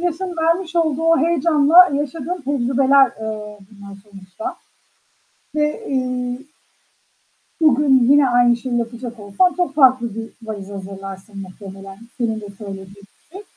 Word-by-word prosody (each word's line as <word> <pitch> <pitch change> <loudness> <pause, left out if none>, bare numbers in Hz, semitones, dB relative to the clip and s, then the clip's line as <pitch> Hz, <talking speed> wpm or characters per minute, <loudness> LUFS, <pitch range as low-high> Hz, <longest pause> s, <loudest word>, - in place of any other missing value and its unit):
yaşın 355 +1 -3
vermiş 335 +2 0
olduğu 320 -3 +1
o 330 0 +4
heyecanla 330 +2 +5
yaşadığın 295 +5 -3
tecrübeler, 270 0 +3
eee, 210 -1 -6
bunlar 200 -1 -12
sonuçta 200 - -9 1.0
ve, 300 +9 -1
ııı, 250 -1 -2 1.2
bugün 285 -3 +4
yine 285 -1 +5
aynı 245 0 +4
şeyi 240 0 -3
yapacak 235 0 -5
olsan, 210 - +1
çok 355 -6 -2
farklı 255 -6 +3
bir 225 0 -6 0.2
valiz 200 -3 -6
hazırlarsın 195 +1 -9
muhtemelen, 195 0 -11 0.2
senin 225 -3 -2
de 205 - -9
söylediğin 195 -2 -8
gibi. 200 - -15
255 Hz, 125 wpm, -19 LUFS, 210-305 Hz, 1.2 s, heyecanla